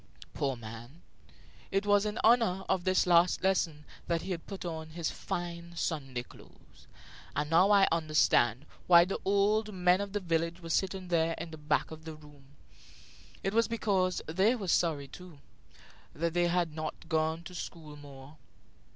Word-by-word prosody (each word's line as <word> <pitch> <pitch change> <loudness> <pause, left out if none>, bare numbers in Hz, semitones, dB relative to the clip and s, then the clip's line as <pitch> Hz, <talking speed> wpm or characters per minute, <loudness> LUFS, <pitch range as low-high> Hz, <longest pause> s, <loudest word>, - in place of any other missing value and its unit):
Poor 135 -2 -1
man! 115 +7 -11 0.7
It 195 +1 0
was 205 0 +3
in 210 - -4
honor 220 -5 +4
of 190 -1 0
this 185 0 +3
last 175 0 +4
lesson 165 -5 0 0.2
that 170 -1 -1
he 190 - -5
had 170 -2 -5
put 195 -2 -7
on 160 -2 -5
his 165 0 -3
fine 170 -1 -5
Sunday 135 -7 -3
clothes, - - -19 0.5
and 150 +2 -2
now 180 +4 +5
I 200 -2 +6
understood 155 -6 +2 0.2
why 170 -1 +8
the 190 - -3
old 210 +2 +2
men 180 0 +2
of 200 -1 -5
the 205 - 0
village 170 -2 -1
were 165 -2 -7
sitting 190 0 -1
there 165 -1 +1
in 165 0 -6
the 160 - -8
back 150 +1 0
of 160 0 -10
the 160 -1 -7
room. 150 -2 -17 1.0
It 195 - -1
was 230 +1 +3
because 195 -5 0
they 190 +9 +2
were 205 -6 -5
sorry, 155 -6 +1
too, 180 +2 -12 0.8
that 165 +1 -1
they 175 0 +2
had 170 -2 0
not 155 +1 -6
gone 160 0 0
to 180 - -10
school 160 -4 -8
more. 145 0 -13
170 Hz, 170 wpm, -30 LUFS, 155-190 Hz, 1.0 s, why